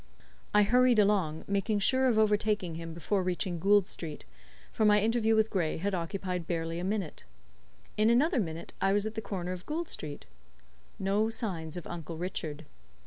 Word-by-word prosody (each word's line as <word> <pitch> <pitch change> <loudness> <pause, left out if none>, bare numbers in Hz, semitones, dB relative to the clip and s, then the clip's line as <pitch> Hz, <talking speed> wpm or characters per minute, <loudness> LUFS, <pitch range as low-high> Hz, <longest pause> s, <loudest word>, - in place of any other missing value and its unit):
I 210 - +5
hurried 250 +2 +4
along, 195 -7 +2
making 200 +2 0
sure 260 +6 +3
of 235 -4 +2
overtaking 210 -4 +2
him 165 0 -6
before 180 +4 -1
reaching 180 -1 -2
Gould 200 +2 +4
Street, 160 -5 -7 0.5
for - - -1
my 210 -1 +6
interview 225 +1 +2
with 220 0 +2
Gray 175 -6 0
had 200 +4 -2
occupied 180 0 -3
barely 165 -1 -2
a - - -4
minute. 195 -4 -3 0.7
In 215 +1 +4
another 265 +6 +3
minute 165 -5 -4
I 195 0 +3
was 205 +1 +1
at 220 - -3
the 220 - -4
corner 185 -4 -4
of 185 0 -7
Gould 325 +2 -2
Street. 150 - -6 0.7
No 200 +3 +1
signs 180 -8 -4
of 175 - -6
Uncle 165 -1 -6
Richard. 160 -3 -4
195 Hz, 175 wpm, -30 LUFS, 170-215 Hz, 0.7 s, my